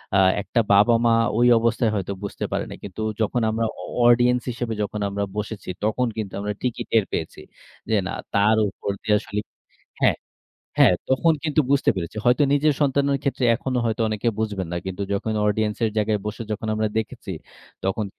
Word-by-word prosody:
আ - - +5 0.2
একটা 115 - -1
বাবা-মা 115 +3 +5 0.2
ওই 120 +1 +5
অবস্থায় 115 0 +1
হয়তো 100 0 -2
বুঝতে 100 - -4
পারে - - -1
নাই। - - -8
কিন্তু 100 +2 -7 0.2
যখন 110 +3 +1
আমরা 115 +1 0 0.2
অ - - -7 0.2
audience 120 +1 +4
হিসাবে 120 -1 -3
যখন 105 +1 -4
আমরা 100 +1 -2
বসেছি, 105 -1 -5
তখন 110 +4 +1
কিন্তু 105 -3 -4
আমরা 105 +1 -2
ঠিকই 125 -2 -2
টের 110 -3 +4
পেয়েছি। 80 - -4 0.5
যে, 110 - +3
না, - - -4 0.2
তার 105 +2 +4
উপর 100 - -4
দিয়ে 105 -1 +3
আসলে 105 - -4 0.6
হ্যাঁ। - - +4 0.6
হ্যাঁ, - - +7 0.2
তখন 145 +5 +3
কিন্তু 155 -1 +2
বুঝতে 140 -1 +4
পেরেছি। 85 +2 -5
হয়তো 125 +4 +4
নিজের 145 +1 +3
সন্তানের 140 0 +2
ক্ষেত্রে 140 -2 -1
এখনো 130 +1 -2
হয়তো 115 0 -1
অনেকে 110 +2 -1
বুঝবেন 105 -4 -2
না। - - -1
কিন্তু 95 +1 -4
যখন 100 +2 -1
audience 105 0 0
এর 110 - +1
জায়গায় 105 0 +1
বসে 105 +2 -4
যখন 105 +1 -4
আমরা 110 0 0
দেখেছি, 110 -1 -5 0.6
তখন 95 +3 0
110 Hz, 180 wpm, -23 LUFS, 105-120 Hz, 0.6 s, হ্যাঁ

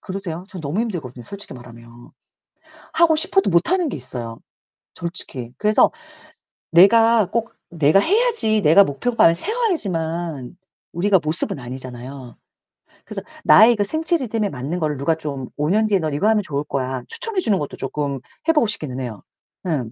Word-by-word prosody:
그러세요? 185 -3 -6
저는 185 -3 -9
너무 155 +8 -2
힘들거든요 155 - -5
솔직히 200 - -10
말하면. 120 -1 -14 0.8
하고 335 -2 +4
싶어도 380 +4 +2
못하는 320 - +2
게 - - -5
있어요 120 -3 -7 0.6
솔직히. 135 -8 -6
그래서 210 0 +3 0.8
내가 225 +4 +5
꼭 230 0 -2 0.2
내가 160 +2 +3
해야지 400 - +2
내가 165 +5 +6
목표반 170 - +2
세워야지만 175 - -2 0.4
우리가 190 +3 +2
모습은 155 +1 -2
아니잖아요. 125 0 -8 0.7
그래서 - - -6 0.2
나의 230 +2 +7
그 205 - 0
생체 320 - 0
리듬에 225 -7 -2
맞는 140 +5 -4
거를 150 -3 -1
누가 145 +5 0
좀 140 -5 -5
5 150 +1 -1
년 215 +4 +2
뒤에 200 -3 +2
"넌 155 -3 -2
이거 150 +9 0
하면 220 -1 +3
좋을 145 -5 -3
거야." 130 -2 -3
추천해 450 -4 +1
주는 210 - +1
것도 145 - -5
쪼끔 140 0 -3 0.3
해 325 - +5
보고 295 -7 +3
싶기는 150 - -2
해요. 120 -6 -6 0.4
음. 135 -9 -2
170 Hz, 345 characters per minute, -21 LUFS, 135-220 Hz, 0.8 s, 나의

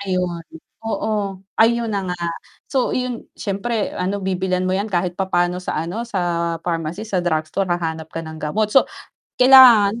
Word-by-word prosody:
Ayon, 180 -3 -2 0.4
oo, 210 -3 -2 0.2
ayun 230 0 +3
na 200 - 0
nga. 180 - -2 0.6
So, 260 -3 +1
iyon 250 -2 -4
siyempre 210 +2 -2
ano 195 +3 -2
bibilhan 185 -1 -1
mo 185 - 0
'yan 200 +3 -1
kahit 180 -2 -1
papaano 180 -1 0
sa 160 -3 -3
ano 190 +8 -4
sa 170 -4 -1
pharmacy, 170 +3 -3
sa 200 -4 -1
drugstore, 175 +3 -1
hahanap 160 -2 -2
ka 165 0 -6
ng 160 0 -8
gamot, 210 +7 -1
so 270 - +7 0.5
kailangan, 245 -5 +7
190 Hz, 155 wpm, -20 LUFS, 175-215 Hz, 0.6 s, so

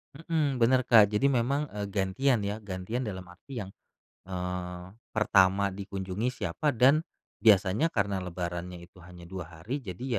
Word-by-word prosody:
Mhm, 155 -3 -1
bener 130 +2 +4
Kak. 110 -3 +7
Jadi 105 +7 +2
memang, 140 +3 +1
eee, 105 -1 -3
gantian 105 +6 +1
ya, 100 +1 -2
gantian 100 +6 -4
dalam 95 -4 -5
arti 115 +8 -9
yang, 95 - -6 0.6
eee, 90 -1 -4 0.3
pertama 100 -2 +3
dikunjungi 100 +3 -3 0.2
siapa 85 - -1
dan 135 +6 +5 0.4
biasanya 105 - +4
karena 100 -8 -1
lebarannya 85 0 -5
itu 90 +1 -18
hanya 85 0 -13
2 90 -1 -7
hari, 130 - -3
jadi 95 +1 -7
100 Hz, 145 wpm, -29 LUFS, 90-125 Hz, 0.6 s, Kak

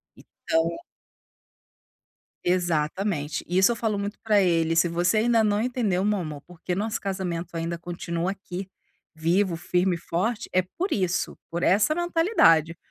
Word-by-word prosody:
Então 165 +1 -1 1.8
Exatamente. 170 -2 0
Isso 190 +4 +4
eu - - -4
falo 220 -3 -1
muito 205 +1 -4
pra 210 -2 +3
ele: 165 -2 +2
"Se 170 +1 +4
você 175 +4 +1
ainda 225 0 +3
não 210 -1 +2
entendeu 220 -6 0
meu 210 -1 +1
amor, 155 -4 -6
porque 180 +1 -6
o - - -1
nosso 215 +2 -1
casamento 180 -3 -4
ainda 165 +1 -2
continua 170 +1 -3
aqui, 195 -1 -6 0.5
vivo, 170 +3 +1
firme 180 +2 0
e - - -8
forte. 190 +7 -2
É 185 - +3
por 340 - -4
isso, 185 -3 -1
por 170 +1 -3
essa 210 +11 +3
mentalidade. 330 - +3
180 Hz, 150 wpm, -25 LUFS, 170-210 Hz, 1.8 s, Isso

